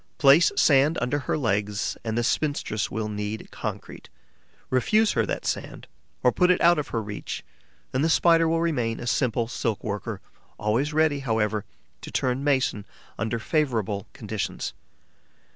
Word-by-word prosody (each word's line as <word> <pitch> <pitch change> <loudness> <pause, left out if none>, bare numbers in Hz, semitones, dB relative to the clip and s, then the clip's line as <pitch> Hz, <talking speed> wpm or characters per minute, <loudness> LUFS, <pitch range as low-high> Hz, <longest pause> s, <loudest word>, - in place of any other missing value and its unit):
Place 145 +3 +6
sand 145 +3 +4
under 125 +4 0
her 140 - -1
legs 105 -5 -1
and 110 0 -2
the 120 - +1
spinstress 140 -6 -1
will 110 -1 -3
knead 105 +1 -4
concrete; - - -6 0.6
refuse 215 - +3
her 115 -3 +1
that - - -3
sand, - - -3 0.4
or 125 - +5
put 180 +6 +3
it 180 - +4
out 170 -2 +5
of 150 - -3
her 115 -2 -2
reach, 105 0 -6 0.5
and 130 +2 +1
the 160 - +2
Spider 165 0 +4
will 165 0 +1
remain 125 -9 0
a - - -6
simple 120 -2 +1
silk 115 -2 -2
worker, 105 0 -4 0.4
always 115 +8 0
ready, 155 -2 +2
however, 110 -5 0 0.4
to - - -8
turn 130 +1 -1
mason 135 -7 +1 0.4
under 110 +2 -1
favourable 110 - -1
conditions. 105 -2 -4
120 Hz, 155 wpm, -25 LUFS, 110-150 Hz, 0.6 s, Place